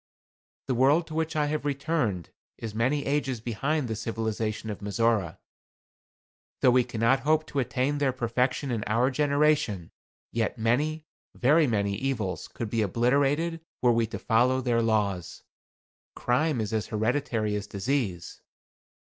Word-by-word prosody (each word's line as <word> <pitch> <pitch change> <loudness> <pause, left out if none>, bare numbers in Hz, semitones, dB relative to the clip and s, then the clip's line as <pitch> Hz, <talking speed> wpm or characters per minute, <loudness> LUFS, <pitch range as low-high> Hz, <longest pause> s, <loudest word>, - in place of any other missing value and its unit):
The 130 - -1
world 140 +7 +4
to 160 - -10
which 160 0 -1
I 150 -1 +2
have 150 +1 -2
returned 140 - -1 0.3
is 110 -2 -6
many 130 +6 0
ages 135 -4 0
behind 130 +6 -1
the 110 - -3
civilization 110 -1 -3
of 105 - -6
Mizora. 105 -4 0 1.2
Though 130 - +6
we 125 0 +4
cannot 115 +3 +1
hope 155 +3 +2
to 145 - -3
attain 130 +3 0
their 140 -2 +2
perfection 125 +2 -1
in 115 -3 -1
our 120 +5 +2
generation, 140 - +1 0.4
yet 115 +1 -1
many, 150 +8 0 0.3
very 150 +4 +4
many, 100 -4 0
evils 110 -7 -2
could 115 -3 -6
be 115 - +1
obliterated 140 - +1 0.2
were 125 - +6
we 115 -1 +1
to - - -5
follow 125 +3 +2
their 120 -2 +1
laws. 105 -6 -1 0.7
Crime 130 +3 +1
is 105 0 -3
as 110 -1 -1
hereditary 110 -1 -1
as 105 0 -4
disease. 100 -5 -2
125 Hz, 145 wpm, -27 LUFS, 110-145 Hz, 1.2 s, Though